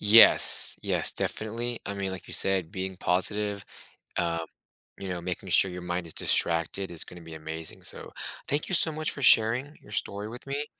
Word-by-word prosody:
Yes. 110 +2 +7
Yes, - - 0
definitely 115 +2 -4
I 100 - -4
mean, 100 -1 -4
like 95 - -10
you - - 0
said, 95 -4 +2
being 95 0 -6
positive, 100 +3 -2 0.5
um, 85 -1 -2 0.5
you 95 - -8
know, 90 -1 -5
making 90 0 -6
sure 95 - +3
your 90 0 -8
mind 90 0 -4
is 80 - -5
distracted 85 +3 0
is 85 -2 0
gonna 90 - -13
be 80 -1 -12
amazing. 80 +1 -6
So, - - -6 0.4
thank 145 +1 0
you 190 - -2
so 165 - +5
much 155 0 -3
for 140 - -6
sharing 120 +6 +5
your 105 - -16
story 100 0 -4
with 120 +4 -11
me. 140 +2 -4
95 Hz, 190 wpm, -26 LUFS, 85-115 Hz, 0.5 s, Yes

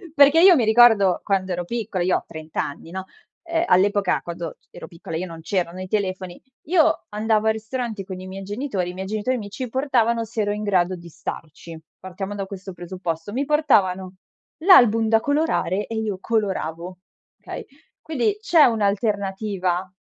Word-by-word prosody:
perché 290 +3 +6
io 370 -2 +8
mi 245 - +2
ricordo 220 -5 +5
quando 190 -2 0
ero 175 0 -3
piccola 210 -4 -3
io 185 - +2
ho - - -7
30 160 -1 -4
anni, 155 +3 -8
no, 190 0 -5 0.4
ehm, 335 0 0
all'epoca, 200 +1 +3
quando 170 -1 -6
c - - -38
ero - - -10
piccola 165 -1 -8
io, 185 +2 -4
non 165 -1 -9
c'erano 180 0 -2
i 185 - -6
telefoni, 185 -3 -3 0.3
io 325 -2 +3
andavo 215 +1 0
al 220 - +4
ristorante 220 -2 -4
con 185 -1 -7
i 185 - -9
miei 195 +1 -7
genitori, 205 -3 -3
i - - -6
miei 190 +1 -6
genitori 215 +5 -1
mi 205 -2 -7
ci 250 +5 -5
portavano 235 -3 +1
se 225 0 -3
ero 205 - 0
in 210 +1 -3
grado 185 -2 +1
di 170 0 -12
starci, 160 +1 -8 0.2
partiamo 190 +2 -6
da 195 -1 -3
questo 190 -1 -8
presupposto; 175 0 -5
mi 275 +4 -1
portavano 190 -11 +2 0.5
l'album 230 - +6
da 225 0 +4
colorare 285 - 0
e 225 - -5
io 215 -3 -2
coloravo, 185 -5 -2 0.4
okay, - - -7 0.4
quindi 320 - -1
c'è 340 -10 +5
un'alternativa 200 -4 -1
205 Hz, 175 wpm, -22 LUFS, 185-230 Hz, 0.5 s, io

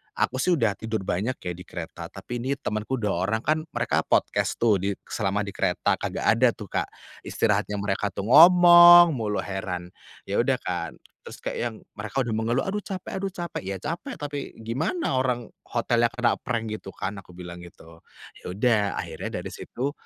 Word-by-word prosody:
aku - - 0
sih 180 - +2
udah 115 -9 0
tidur 110 -3 -3
banyak 105 +8 -1
ya 90 - -3
di 90 +1 -10
kereta, 85 0 -7
tapi 100 +6 -7
ini 135 +3 -1
temenku 110 -1 -3
2 105 -7 -1
orang 110 +2 -1
kan 155 +2 +2
mereka 120 - 0
podcast - - +1
tuh 110 -5 +3
di 100 +1 -1 0.2
selama 105 -1 0
di 100 - -6
kereta, - - 0
kagak - - -3
ada 115 +1 +4
tuh 105 -3 -10
Kak - - -1 0.3
istirahatnya 105 - 0
mereka 100 0 -1
tuh 100 - -3
ngomong 175 +1 +9
mulu, 110 -7 -2
heran. 90 -3 -5 0.3
Ya - - -1
udah - - +3
kan, - - -3 0.3
terus - - -11
kayak - - -3
yang 120 -2 -2 0.2
mereka 110 +6 -3
udah 115 - -4
mengeluh, 115 +4 0
"Aduh 200 +2 -2
capek 190 -1 -6
aduh 195 - -2
capek." 175 -1 -5
"Ya 100 - -2
capek 170 - -5
tapi 145 -1 -6
gimana 130 - -1
orang 125 -3 -1 0.2
hotelnya 120 0 +2
kena 120 +1 0
prank 115 -3 -3
gitu 95 -2 -7
kan," 100 0 -4
aku 90 -2 -15
bilang 90 -1 -8
gitu. 85 -1 -14 0.4
Ya - - -20
udah 115 +1 +3 0.2
akhirnya - - -6
dari - - -6
situ, 135 +4 -4
115 Hz, 185 wpm, -25 LUFS, 100-135 Hz, 0.4 s, ngomong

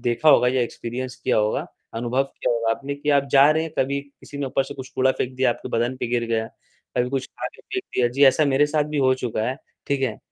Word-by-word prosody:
देखा 120 +6 +1
होगा 125 - +6
या 130 0 +1
एक्सपीरियंस 120 +1 -5
किया - - 0
होगा, 105 0 +1 0.3
अनुभव 120 +3 0
किया 135 - -2
होगा 115 -1 0
आपने 135 +5 -2
कि 145 +1 -2
आप 140 0 +3
जा 140 +2 +7
रहे 160 +1 +2
हैं 160 -1 -5
कभी 140 +1 +1
किसी 140 0 -13
ने 140 - -2
ऊपर 135 - +1
से 140 - -8
कुछ 130 -1 -8
कूड़ा 130 0 +3
फेंक 130 0 -3
दिया, 130 -1 +3
आपके - - -5
बदन 120 +2 0
पे - - -3
गिर 120 -1 +1
गया। 110 -1 0 0.5
कभी 125 0 +2
कुछ 135 -1 -2
खाके - - -8
फेंक 380 - -4
दिया 120 -1 +3
जी, 135 +4 +3
ऐसा 135 +3 +5
मेरे 140 +1 +3
साथ 150 0 +1
भी 150 0 -3
हो 130 -1 +4
चुका 120 -4 -3
है, 130 - -1 0.3
ठीक 140 -1 0
है? 115 -5 -1
130 Hz, 255 wpm, -23 LUFS, 120-140 Hz, 0.5 s, जा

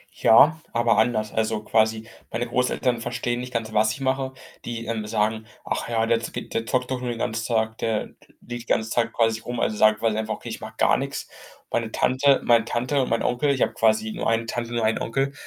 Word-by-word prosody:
Ja, 150 +8 +6
aber 115 -2 +3
anders. 110 -2 +1
Also, 110 -1 -1
quasi 110 0 +1 0.2
meine 120 +1 -2
Großeltern 125 -1 0
verstehen 120 +1 -2
nicht 125 0 -6
ganz, 110 -1 -3
was 110 0 +3
ich - - -9
mache. 130 0 -1 0.3
Die, 115 -1 -5
ähm, 110 -2 -3
sagen: 110 +1 -1 0.2
„Ach - - -3
ja, 115 -1 +1
der 115 0 +2
z 115 - -7
geht - - -6
der 115 - -2
zockt 125 0 0
doch 130 - -1
nur 125 - -3
den 120 - -3
ganzen 115 -1 -2
Tag, 110 -1 0
der 110 -2 0
l - - -11 0.3
liegt 120 -1 -7
die - - -25
ganze 110 0 -1
Zeit 120 - +1
quasi 115 -1 +1
rum.“ 120 +1 -5
also, 110 - 0
sagen 110 0 +4
weil 115 -2 +1
einfach 110 0 -2
okay, - - -9
ich - - -6
mache - - -8
gar - - +4
nichts. - - -4 0.4
Meine 115 -1 -1
Tante 135 +4 +3
meine 115 -1 +4
Tante 125 +4 0
und 130 - -1
mein 115 0 0
Onkel 125 +4 +1
ich 130 - +2
habe - - -1
quasi 110 0 +2
nur - - -2
1 115 0 +1
Tante, 120 +1 -4
nur 115 -2 +1
1 110 +1 +1
Onkel. 135 +4 -1
115 Hz, 235 wpm, -24 LUFS, 110-120 Hz, 0.4 s, Ja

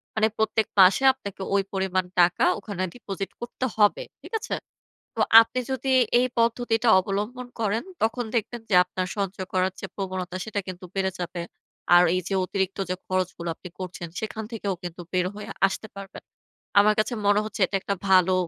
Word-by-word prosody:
মানে 220 0 +3
প্রত্যেক 220 0 +1
মাসে 190 +7 +6
আপনাকে 200 -7 -9
ওই 200 - +4
পরিমাণ 190 -1 0 0.2
টাকা 175 0 +3
ওখানে 200 -2 -4
deposit 195 -5 -6
করতে 240 +2 -4
হবে। 210 - +4 0.2
ঠিক - - -13
আছে? 455 - -3 0.6
তো - - -6 0.2
আপনি 230 +3 -2
যদি 265 0 0 0.3
এই 250 - +2
পদ্ধতিটা 230 0 +2
অবলম্বন 210 +6 -3
করেন। 220 0 0 0.2
তখন 230 +2 0
দেখবেন, 230 +1 -2
যে 190 - +3
আপনার 185 0 -4
সঞ্চয় 195 -1 -3
করার 185 0 +2
যে - - -3
প্রবণতা, 185 -2 -4
সেটা 215 -2 -2
কিন্তু 185 0 -7
বেড়ে 190 -1 0
যাবে। 175 0 -4 0.5
আর 175 - +8
এই 185 - +2
যে - - -2
অতিরিক্ত 190 0 -2
যে 185 - 0
খরচগুলো, 185 -2 -2
আপনি 180 - -11
করছেন। 185 -1 -6
সেখান 220 0 -4
থেকেও 205 -4 -2
কিন্তু 175 0 -6
বের 180 -1 +2
হয়ে 210 0 -8 0.2
আসতে 220 +3 -6
পারবেন। 195 -1 -9 0.6
আমার 210 +1 +5
কাছে 215 - 0
মনে 205 0 +5
হচ্ছে, 215 -1 -6
এটা 195 - -3
একটা 200 - -2
ভালো 185 -1 +5
200 Hz, 175 wpm, -25 LUFS, 185-220 Hz, 0.6 s, আর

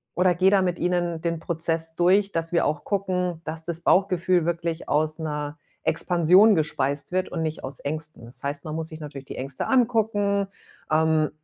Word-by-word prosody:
oder 180 0 +3
gehe 190 +2 +4
da 200 -1 +4
mit 180 -2 0
ihnen 175 -2 0
den 170 -1 -1
Prozess 165 -1 -2
durch, 195 +4 +3
dass 165 +1 -2
wir 170 - +3
auch 150 0 -2
gucken, 180 -4 -1
dass 160 +1 -5
das 170 -1 -4
Bauchgefühl 180 -2 +3
wirklich 170 -1 -2
aus 155 +1 +1
'ner 150 -1 -4 0.3
Expansion 180 +6 +5
gespeist 145 -2 -1
wird 185 +1 0
und 165 - -2
nicht 155 0 -4
aus 130 0 -6
Ängsten. 155 -3 -5
Das 120 - -14
heißt, 145 +4 -4
man 155 - -4
muss 160 0 -3
sich 155 - -9
natürlich 145 -3 -8
die - - -8
Ängste 135 0 -4
angucken, 215 -5 +2 0.4
ähm, 155 -1 +3
165 Hz, 185 wpm, -25 LUFS, 155-180 Hz, 0.4 s, Expansion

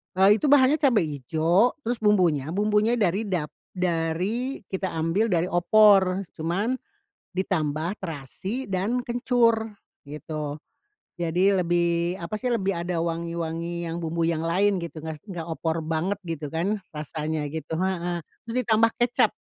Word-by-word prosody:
Eee, 195 +3 +5
itu 300 - 0
bahannya 285 +1 +5
cabe 255 - +4
ijo 160 - +1
terus 235 0 -2
bumbunya 180 -10 +3
bumbunya 210 +3 +2
dari 205 -1 +1
dap 170 -6 -2 0.2
dari 180 +9 -1
kita 190 0 -2
ambil 165 +7 +1
dari 175 +1 +1
opor 190 +1 +5 0.2
cuman 190 +10 -1 0.6
ditambah 170 -2 -1
terasi 185 - -5
dan 200 +7 0
kencur 235 -2 +1 0.3
gitu. 150 0 -5 0.6
Jadi 175 +2 +2
lebih 175 -1 +1
apa 170 +5 -4
sih, 250 +3 -1
lebih 195 -5 0
ada 170 0 -2
wangi-wangi 170 0 -3
yang 165 - -4
bumbu 165 +1 0
yang 165 -1 -1
lain 195 +4 +2
gitu, 170 -3 -6
nggak 160 0 -5
nggak 175 -5 -6
opor 165 0 -2
banget 165 +6 -2
gitu 150 -3 -4
kan 180 +6 0 0.2
rasanya 155 0 -3
gitu. 160 +1 -6
Heeh. 175 -2 -1 0.3
Terus 230 - -5
ditambah 225 0 +3
kecap 240 0 +3
175 Hz, 140 wpm, -25 LUFS, 165-210 Hz, 0.6 s, Eee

